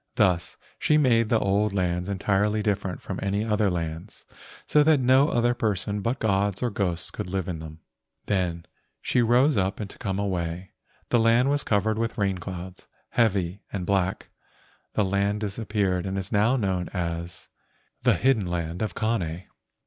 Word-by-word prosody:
Thus 95 -8 +1 0.2
she 150 - +3
made 120 -6 +3
the 115 - +4
old 100 0 +1
lands 90 -1 -1
entirely 105 +2 +1
different 100 -4 -2
from - - -5
any 100 +2 0
other 105 -2 +2
lands, 85 -2 -5 0.4
so 150 - +4
that 150 -1 +5
no 130 +3 +4
other 120 0 +2
persons 105 -3 -1
but 115 +6 -1
gods 100 -1 0
or 120 - 0
ghosts 90 -4 -2
could - - -5
live 95 -1 -2
in 85 -3 -4
them. 80 0 -10 0.4
Then 90 -4 -1 0.3
she 125 - +1
rose 125 +4 +4
up 95 0 +1
to 105 -3 -7
come 95 -1 -2
away. 90 -2 -3 0.4
The 120 - +3
land 115 +4 +4
was 145 0 +1
covered 110 +1 +1
with 115 +1 -2
rainclouds, 95 -2 -4 0.2
heavy 100 -5 +1
and 95 -3 -3
black. 95 -1 0 0.7
The 105 - +2
land 100 +2 0
disappeared 100 -3 -1
and 95 0 -2
is 95 0 -5
now 110 +4 +3
known 95 -7 -1
as 85 -1 -4 0.5
"The - - +4
Hidden 120 -7 +2
Land 85 0 -3
of 105 -5 -2
Kane." 95 -7 -1
100 Hz, 165 wpm, -26 LUFS, 90-110 Hz, 0.7 s, that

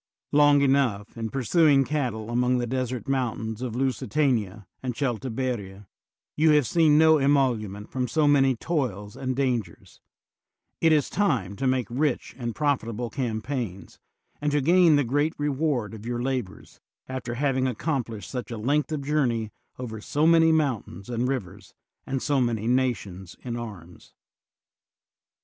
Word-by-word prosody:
Long 145 -1 +5
enough, 130 -7 +1
in 115 -1 -4
pursuing 135 +3 +3
cattle 120 -7 -2
among 125 +1 +2
the 120 - -1
desert 130 +1 -3
mountains 115 -4 -2
of 125 -3 -4
Lusitania* 125 -5 0 0.2
and 125 -2 -3
Celtiberia, 120 -6 -3 0.5
you 155 +1 +4
have 150 -3 +4
seen 155 +1 +4
no 160 0 +6
emolument 120 -8 +1
from 125 -1 -1
so 155 +1 +2
many 135 -2 +4
toils 115 - -3
and 130 -1 -3
dangers; 125 -5 -3 0.8
it 165 - +4
is 150 -3 +3
time 130 - 0
to 135 - -1
make 130 -2 +1
rich 135 +4 -1
and 120 -2 -4
prof 145 -3 +1
itable 115 +1 -5
campaigns, 115 -5 -4 0.4
and 150 0 0
to 145 - +3
gain 170 +2 +5
the 145 - +3
great 145 +6 0
reward 140 -7 -1
of 110 -1 -9
your 120 0 -2
labors, 125 -6 -4 0.3
after 130 -2 -5
having 130 -1 +1
accomplished 120 - -3
such 125 -2 -5
a 115 - -5
length 145 +8 0
of 150 -3 -2
journey 125 -7 0 0.3
over 110 -4 -6
so 150 +7 0
many 165 0 +6
mountains 125 - -1
and 120 +1 0
rivers, 100 -8 -5 0.3
and 135 -1 -2
so 140 -3 +1
many 115 -3 -1
nations 105 -8 -1
in 120 -2 -4
arms. 100 -8 -9
130 Hz, 150 wpm, -26 LUFS, 115-145 Hz, 0.8 s, no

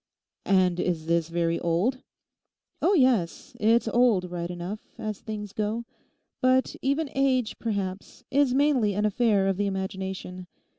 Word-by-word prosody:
'And 185 -2 +3
is 170 -3 -1
this 170 0 +1
very 170 0 0
old?' 185 +10 0 0.8
'Oh 400 - +3
yes, 255 - +1
it's 225 +2 +3
old 225 -7 +2
right 170 -1 -4
enough, 180 +4 -5 0.2
as 215 -2 -4
things 210 -2 -6
go; 220 +2 -2 0.6
but 255 0 +2
even 280 +2 0
age, 260 -4 +1
perhaps, 200 0 -4
is 280 -1 +3
mainly 260 -7 +2
an 210 +1 +1
affair 210 -2 +2
of 195 -1 0
the 205 0 0
imagination. 190 -1 -5
210 Hz, 140 wpm, -26 LUFS, 180-245 Hz, 0.8 s, And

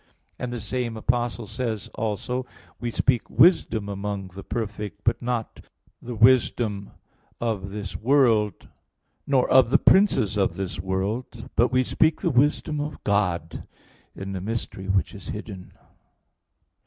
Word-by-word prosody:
11:1), - - -36 0.3
and 125 - -3
the 120 - -4
same 115 +2 -3
Apostle 120 0 -1
says 110 -1 -3
also, 120 +4 -2 0.4
"We 120 - -2
speak 125 +1 +1
wisdom 115 - +4
among 100 -1 -4
the 95 +2 -10
perfect, 105 -2 -5
but 115 - +1
not 120 -2 -3 0.4
the 120 0 -6
wisdom 110 -3 +3 0.5
of 105 -5 -2
this 100 -1 -6
world, 115 -4 +2 0.6
nor 135 -3 +3
of 130 -3 +6
the - - +5
princes 130 - +4
of 100 - +1
this 90 -4 -4
world; 105 +7 -3
but 120 +1 +3
we 130 0 +3
speak 155 +4 +2
the 170 - +1
wisdom 145 +3 +2
of 150 +1 -6
God 90 -6 -1 0.5
in 95 0 -6
a 95 - -4
mystery 100 -2 -4
which 95 -1 +1
is 100 -3 -10
hidden" 100 -3 -7
(1 - - -20
Cor. - - -30
110 Hz, 150 wpm, -25 LUFS, 100-125 Hz, 0.6 s, of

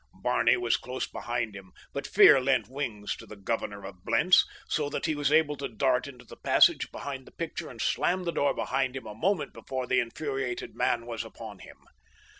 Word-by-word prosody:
Barney - - +3
was 370 0 +1
close 125 +1 -4
behind 120 -3 -3
him, 95 -2 -11 0.2
but 140 0 -4
fear 185 -9 +7
lent 130 -5 +2
wings 120 -6 -4
to - - -12
the 110 - -10
governor 100 -1 -3
of 95 -2 -10
Blentz, 185 - +4 0.2
so 150 -3 0
that - - -3
he 160 - +1
was 145 -1 0
able 155 -1 +4
to 140 - -3
dart 125 +3 +1
into 125 -3 -12
the - - -13
passage - - +4
behind 135 -2 -6
the - - -13
picture 165 0 -5
and 115 - -12
slam 180 +9 +1
the 170 - -1
door 140 -4 +1
behind 135 -1 -1
him 135 - -6
a 105 - -7
moment 180 - 0
before 130 -1 -4
the - - +2
infuriated 130 +1 -3
man 115 -1 +1
was 115 -2 -4
upon - - -10
him. - - -13
130 Hz, 205 wpm, -28 LUFS, 115-145 Hz, 0.2 s, fear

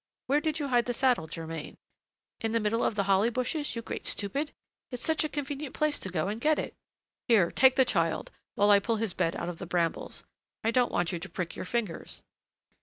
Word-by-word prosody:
Where 285 +3 +2
did 310 0 0
you 290 -2 -2
hide 245 -2 +3
the 245 - -2
saddle, 250 -12 +2
Germain? 160 -1 -6 0.6
In 225 0 -1
the 230 - +3
middle 225 +2 +1
of - - +1
the 200 - +1
holly 195 +3 +3
bushes, 255 +5 -2
you 230 - -4
great - - -5
stupid! 275 +9 -1 0.4
It's 250 -2 -6
such 320 0 +2
a 310 - -1
convenient 290 0 -4
place 305 -1 +1
to 190 - -5
go 175 -1 -1
and 215 +3 -3
get 310 +2 +3
it!" - - -3 0.5
"Here, 210 -9 +5
take 260 0 +5
the 265 -1 +5
child, 165 -8 0 0.2
while 205 +1 +4
I 200 - +8
pull 230 +3 0
his 215 -4 -1
bed 165 - 0
out 170 - -3
of 175 -2 -5
the - - -6
brambles; 170 -2 -1 0.4
I 225 - +2
don't 245 +1 +3
want 175 -1 +1
you 175 - -3
to 190 +3 -7
prick 180 -3 -4
your - - -5
fingers." 210 -5 -3
230 Hz, 225 wpm, -29 LUFS, 185-265 Hz, 0.6 s, I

